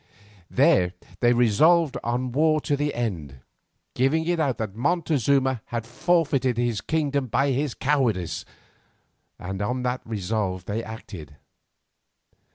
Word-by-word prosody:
There 90 -1 +3 0.3
they 120 - +4
resolved 135 +7 +4
on 125 +2 -1
war 155 +3 +3
to 145 - 0
the 145 +1 -1
end, 80 - -4 0.5
giving 150 +6 +1
it 175 0 0
out 140 -6 0
that 110 -3 -4
Montezuma 140 - +1
had 115 -2 -4
forfeited 140 -2 +1
his 120 -3 0
kingdom 145 -4 -1
by 140 +4 +1
his 135 0 -1
cowardice, 130 - 0 0.9
and 95 +2 -5
on 125 +4 -2
that 125 0 -1
resolve 100 -3 -3
they 110 +4 -3
acted. 90 -9 -9
125 Hz, 125 wpm, -25 LUFS, 110-145 Hz, 0.9 s, they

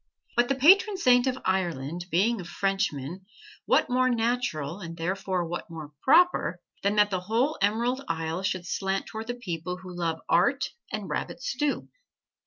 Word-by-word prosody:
But 240 0 +3
the 275 - +2
patron 390 - +5
saint 250 -7 +4
of 260 0 0
Ireland 175 -3 -1
being 200 +6 +2
a - - -7
Frenchman, 185 -3 -2 0.4
what - - +4
more 255 +1 +2
natural, 225 - -1
and 165 -3 -7
therefore 185 +1 -1
what 175 +1 -5
more 155 -3 -8
proper, 355 +6 +4 0.2
than 200 +1 +1
that 210 0 +4
the 185 - 0
whole 230 +11 0
Emerald 235 +6 +1
Isle 165 +2 -2
should 185 -2 -2
slant 195 +1 -1
toward 220 0 -7
the 245 - -3
people 180 -6 -4
who 185 -1 -10
love 165 -2 -1
art 265 +11 +2 0.2
and - - -4
rabbit - - -4
stew! 295 - -1
195 Hz, 165 wpm, -27 LUFS, 175-245 Hz, 0.4 s, patron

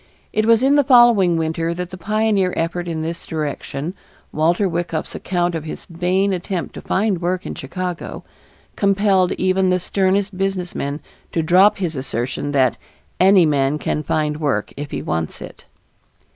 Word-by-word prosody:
It 215 +1 +1
was 230 +1 +5
in 275 +1 +4
the 290 - +5
following 240 - +5
winter 165 +1 -1
that 180 0 -5
the - - -6
pioneer 205 0 +1
effort 175 +1 -2
in 160 -2 -3
this 165 +1 -4
direction, 150 +1 -4 0.4
Walter 170 +6 +2
Wyckoff's 170 -2 -3
account 175 -1 -1
of 165 -2 -3
his 155 - -7
vain 185 +3 0
attempt 180 0 -3
to - - -8
find 195 -3 0
work 180 +1 -1
in - - -4
Chicago, 180 +5 -5 0.5
compelled 195 -2 +2
even 185 0 +1
the 180 - +3
sternest 195 +2 0
businessman 180 -6 -3 0.3
to 165 - +1
drop 185 +5 +5
his 175 -5 -2
assertion 130 +1 -3
that 130 -3 +2 0.4
"any 190 -1 +6
man 145 -1 +1
can 150 - -2
find 150 0 -1
work 150 -3 -1
if 145 0 -6
he - - -4
wants 80 -1 -3
it." - - -11
175 Hz, 160 wpm, -20 LUFS, 160-195 Hz, 0.5 s, any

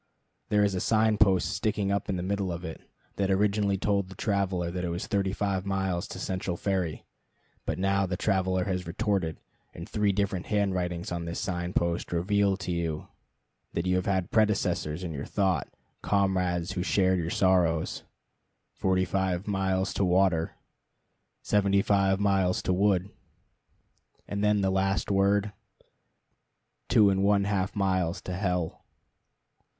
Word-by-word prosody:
There 105 -1 +3
is 100 -1 +2
a 95 - -1
sign 110 +1 +2
post 95 -3 +3
sticking 100 -1 -1
up 100 - -1
in 95 - 0
the 90 - -3
middle 100 -1 -1
of 85 +1 -5
it, 80 - -7 0.4
that 100 -1 0
originally 100 0 +2
told 100 -1 0
the 95 - -10
traveler 95 -5 -1
it 90 0 -3
was 85 +2 -3
thirty 100 -3 0
five 95 -1 -1
miles 95 -3 -1
to - - -8
Central 95 -1 -3
Ferry. 95 -5 -2 0.6
But - - -1
now 95 +1 +1
the 90 0 -2
traveler 95 -2 +1
has 90 -3 -2
retorted; 95 -3 -1 0.4
and - - -7
three 105 -1 +1
different 100 -2 -1
hand 100 -2 +1
writings 90 -1 -3
on 85 -1 -3
this 85 +1 -4
sign 90 -1 -3
post 85 0 -1
reveal 95 +3 +1
to 90 -1 -4
you 85 -3 -3 0.6
that 85 - -1
you 90 0 +2
have 90 - -1
had 95 -3 0
predecessors 95 -6 +1
in 85 - -4
your 70 -1 -5
thought, 95 -3 0 0.3
comrades 95 -3 +1
who 95 - -2
shared 95 -1 +2
your 85 -1 -2
sorrows: 85 -4 +2 0.7
Forty 95 -1 +1
five 95 0 -1
miles 95 -1 0
to - - 0
water. 90 -3 +2 0.9
Seventy 100 -1 +2
five 95 -1 +2
miles 95 -3 +1
to 95 - +1
wood. 95 0 +2 1.2
And 100 0 -3
then 105 -1 +3
the 95 -1 +1
last 95 +1 0
word: 100 +1 +2 1.4
Two 110 -4 +5
and 95 0 +1
one 100 0 +3
half 100 -1 -1
miles 95 -3 0
to 90 - -5
hell. 90 -3 -2
95 Hz, 155 wpm, -28 LUFS, 90-100 Hz, 1.4 s, Two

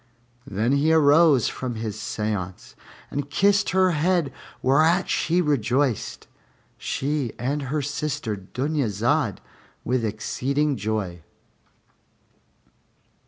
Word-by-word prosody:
Then 110 +5 0
he 140 +3 +3
arose 150 -4 +5
from 125 -2 -4
his 110 -2 -4
séance 100 -4 -4 0.4
and 145 0 -3
kissed 200 +6 +3
her 185 -1 +3
head, 165 -3 +1 0.3
whereat 160 +7 +3
she 175 +3 +1
rejoiced, 135 - 0 0.5
she 140 -3 -2
and 140 +5 -1
her 150 +1 -1
sister 145 -5 -2
Dunyazad, 120 - -1 0.4
with 125 0 0
exceeding 140 +7 -1
joy. 105 -6 -3
140 Hz, 95 wpm, -24 LUFS, 110-150 Hz, 0.5 s, arose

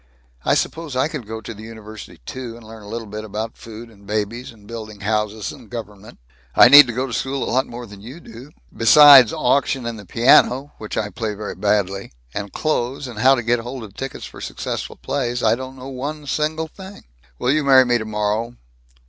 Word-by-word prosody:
I - - +2
suppose 160 -5 -3
I 130 +3 +2
could 145 -9 -7
go 110 0 -6
to 115 - -7
the 105 - -12
university, 110 -1 -11
too, 125 -3 -7
and 115 - -15
learn 110 0 -11
a 100 - -13
little 110 -1 -7
about 110 +2 -5
food 115 +1 -11
and 100 -2 -19
babies 110 +4 -3
and 105 -3 -19
building 110 -2 -9
houses 105 0 -2
and - - -14
government. 110 -2 -9 0.4
I 120 - +8
need 145 0 +10
to 120 - -4
go 130 +3 -1
to 125 - -7
school 135 +3 -2
a - - -3
lot 130 +1 +1
more 120 0 -8
than 100 -2 -13
you 125 +10 -10
do. 120 -2 -12 0.3
Besides 135 0 +8
auction 135 0 0
and 115 -2 -5
the 100 - -11
piano 130 +5 +4
which 110 - -6
I 105 -1 -2
play 110 -2 -4
very 105 0 -6
badly 100 -2 -1 0.2
and 100 -1 -5
clothes 135 -3 -2
and 115 -4 -8
how 130 +3 +6
to 120 - -3
get 120 +1 +1
hold 120 +1 -7
of 105 -3 -11
tickets 135 +3 -6
for - - -11
successful - - -5
plays, 125 -3 -3
I 110 - +4
don't 130 +2 -6
know 130 +1 -8
one 145 +3 -6
single 155 +2 -1
thing." 190 +4 -12 0.3
"Will 125 - 0
you 155 +1 +1
marry 135 -2 +6
me, 120 -1 +2
tomorrow?" 110 +2 -2
115 Hz, 210 wpm, -20 LUFS, 110-130 Hz, 0.4 s, need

